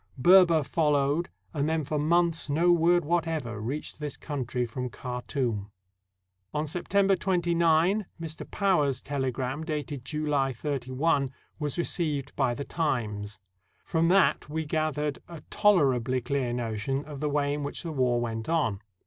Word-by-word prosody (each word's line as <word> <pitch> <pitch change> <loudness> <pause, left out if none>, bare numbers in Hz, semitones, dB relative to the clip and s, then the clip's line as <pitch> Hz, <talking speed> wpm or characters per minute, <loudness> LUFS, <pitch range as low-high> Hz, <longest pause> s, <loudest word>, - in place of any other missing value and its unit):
Berber 170 +2 +6
fol 150 +2 +1
lowed, 145 +5 +1 0.2
and 150 0 0
then 160 -1 0
for 150 +2 -2
months 165 +1 +2
no 165 +5 +3
word 175 0 +4
whatever 160 -9 -1
reached 140 +9 -4
this 150 -1 -4
country 130 -4 -3
from 125 +2 -4
Khartoum. 125 -3 -3 0.9
On 150 +1 0
September 195 +5 +2
29, 175 +1 +2
Mr. 160 -1 -6
Power's 165 -9 +2
telegram, 135 +1 -2
dated 150 -4 -4
July 145 -2 0
31, 140 +2 0 0.3
was 150 0 -2
received 155 -5 -1
by 125 -3 +1
the 140 - -5
"Times." 105 - -2 0.4
From 165 -1 +1
that 185 -4 +3
we 160 +1 -2
gath 155 0 0
ered 150 -1 -2
a 170 -3 -9
tolerably 135 - +3
clear 130 0 -1
notion 120 +3 -2
of 145 -2 -8
the 150 0 -1
way 145 0 +1
in 145 - -3
which 140 - -5
the 165 -2 -4
w^ar 125 -3 +2
went 115 0 -3
on. 130 -12 +1
145 Hz, 150 wpm, -28 LUFS, 130-165 Hz, 0.9 s, Berber